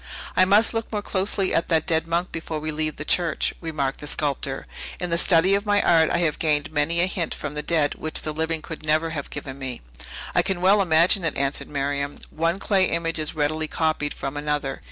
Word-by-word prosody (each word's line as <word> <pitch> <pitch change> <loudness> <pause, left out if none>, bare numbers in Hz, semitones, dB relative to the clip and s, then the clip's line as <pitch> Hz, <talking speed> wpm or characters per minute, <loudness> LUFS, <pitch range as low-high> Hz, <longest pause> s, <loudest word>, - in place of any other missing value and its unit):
"I 185 - +5
must 205 +5 +4
look 225 0 -3
more 210 -2 -2
closely 195 0 0
at 165 - +1
that 160 -2 +1
dead 160 0 +1
monk 170 +2 -1
before 160 -1 -4
we 155 +1 -3
leave 155 0 -2
the 155 - -7
church," 170 -1 +1
remarked 150 -5 -2
the 150 - -6
sculptor. 140 -2 -2 0.3
"In 180 -1 -3
the 170 - +2
study 180 +2 +6
of 200 +1 0
my 205 0 +3
art, 165 -4 +4
I - - +1
have 155 - -1
gained 150 0 0
many 155 +3 +1
a - - +4
hint 185 -2 -2
from 145 -1 -5
the 150 - -3
dead 150 -3 +1
which 155 - -2
the 155 - -2
living 160 0 -2
could 160 -1 -8
never 155 +1 +1
have 145 -3 -5
given 135 0 -7
me." 130 -3 -5 0.5
"I - - +4
can 190 -2 -1
well 195 +3 +4
imagine 175 +2 +3
it," 165 - -1
answered 140 +1 -1
Miriam. 140 0 -2 0.2
"One 165 +3 0
clay 195 -1 +2
image 165 -1 -1
is 155 0 -1
readily 155 +1 0
copied 155 -2 -1
from 135 +1 -5
another. 145 -2 -2
160 Hz, 220 wpm, -24 LUFS, 150-175 Hz, 0.5 s, study